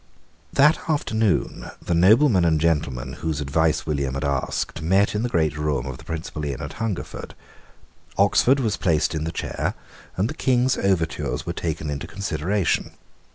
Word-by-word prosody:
That 150 +4 +5
afternoon 110 - 0
the 85 - -2
noblemen 100 - +5
and 80 -2 +3
gentlemen 70 -5 0
whose 80 -3 -1
advice 75 +2 +1
William 70 -4 -1
had 70 - -3
asked 70 +3 -2
met 95 +5 +2
in 105 - -1
the 120 - -1
great 80 -7 +1
room 75 -4 -1
of 65 -1 -6
the - - -12
principal 80 -2 -5
inn 70 -4 -3
at - - -6
Hungerford. 110 -5 -4 0.8
Oxford 135 +3 +4
was 110 -6 0
placed 80 -4 +1
in 80 0 -2
the 80 - -2
chair; - - -3 0.4
and 95 +4 +2
the 140 - -4
King's 130 -3 +2
overtures 90 -5 -1
were 85 - -3
taken 75 -3 -3
into 70 0 -4
consideration. 100 0 -1
80 Hz, 160 wpm, -23 LUFS, 75-105 Hz, 0.8 s, That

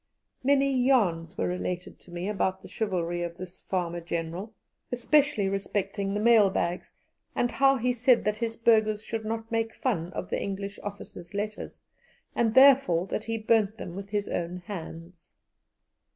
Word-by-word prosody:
Many 275 0 +3
yarns 185 -10 +2
were - - 0
related 180 0 -4
to 175 - -16
me 175 +2 -4
about 190 -2 -1
the - - -9
chivalry 175 -5 -2
of 170 -1 -4
this 185 0 -9
farmer 175 -2 -2
General, 170 +5 -4 0.4
especially 250 -3 +2
respecting 195 0 -2
the - - 0
mail 220 -2 +6
bags, 175 -1 -2 0.4
and 245 - +1
how 270 +1 +4
he 250 +1 +1
said 245 0 +3
that 210 0 -1
his 230 -1 -2
burghers 215 -2 +3
should 225 -1 -4
not 225 +1 -4
make 225 -1 -1
fun 180 -9 -1
of - - -5
the - - -1
English 200 +1 -4
officers' 200 -3 -8
letters, 210 +1 -5 0.5
and 225 -2 +1
therefore 260 -11 +6
that - - -4
he 225 0 -2
burnt 220 -1 +2
them 175 -5 -7
with 195 +1 -7
his 205 -1 -1
own 175 +1 -3
hands. 170 -3 -9
205 Hz, 165 wpm, -28 LUFS, 180-225 Hz, 0.5 s, mail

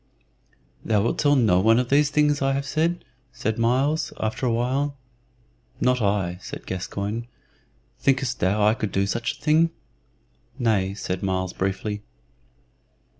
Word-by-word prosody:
"Thou 110 -2 +2
wilt 115 - -1
tell 145 -1 +4
no 110 -9 +4
one 110 +4 +4
of 125 -1 0
these 145 +1 +4
things 150 -1 +2
that 135 - 0
I 135 - +2
have 140 +1 -2
said?" 165 +5 -1 0.3
said 110 +1 -3
Myles, 130 +7 +1
after 110 +4 -1
a - - +2
while. 135 +5 0 0.8
"Not 125 -1 +2
I," 100 -4 0
said - - -8
Gascoyne. 100 +5 -4 0.7
"Thinkest 135 -2 +1
thou 105 +3 +2
I 105 - +5
could 110 -3 -3
do 100 0 +1
such 115 +4 -1
a - - -24
thing?" 160 +2 +4 0.9
"Nay," 100 -5 +1
said 90 -3 -4
Myles, 95 -1 -1
briefly. 100 +2 -2
115 Hz, 150 wpm, -24 LUFS, 100-140 Hz, 0.9 s, I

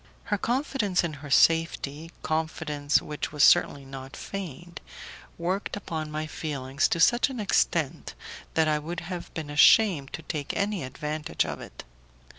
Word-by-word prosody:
Her 205 - -1
confidence 240 -7 0
in 170 -2 -2
her 145 - -8
safety, 165 0 +2
confidence 155 -2 0
which 150 -1 -4
was 150 -1 +2
certainly 140 -1 +5
not 135 0 -9
feigned, 175 -3 -7 0.6
worked 185 +4 -2
upon 160 -6 -4
my 155 +1 -3
feelings 140 -3 -1
to 170 - -1
such 240 +10 +4
an 260 -3 -6
extent 205 - 0 0.4
that 160 -1 +3
I 150 -1 +2
would 170 +3 -5
have 175 0 -6
been 155 -3 -5
ashamed 145 -1 +5
to 160 - -6
take 150 -2 -4
any 200 -4 -1
advantage 150 +3 -2
of - - -5
it. - - -10
160 Hz, 150 wpm, -27 LUFS, 145-180 Hz, 0.6 s, certainly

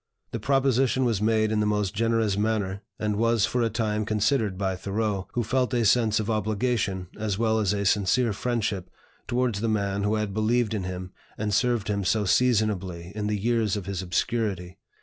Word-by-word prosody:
The 115 - -3
proposition 130 +1 +2
was 115 -4 0
made 110 0 +2
in 110 - +1
the 105 - +1
most 105 -2 0
generous 115 -1 +1
manner, 105 -2 -1 0.2
and 105 -1 -1
was 115 -1 +3
for 125 - -1
a 115 - +2
time 110 -2 -1
considered 110 -1 0
by 95 -1 -1
Thoreau, 100 0 -2
who 120 - 0
felt 125 +3 0
a 120 -2 +2
sense 110 0 +3
of 110 - -2
obligation 110 -3 -1
as 105 -3 -1
well 110 0 +2
as 105 -3 +1
a 100 -1 -1
sincere 105 +4 +2
friendship 105 -5 -2 0.4
towards 120 -4 0
the 115 - 0
man 100 -2 0
who 105 +2 +1
had 105 -2 -2
believed 110 +2 +1
in 100 -4 -2
him 90 0 -5 0.3
and 105 -1 -2
served 120 -1 +1
him 100 -1 -1
so 105 +3 +1
seasonably 100 -7 +1
in 105 -1 -3
the 105 0 0
years 110 -1 +1
of 100 - -5
his 95 -2 -3
obscurity. 95 -1 -2
105 Hz, 190 wpm, -26 LUFS, 100-115 Hz, 0.4 s, was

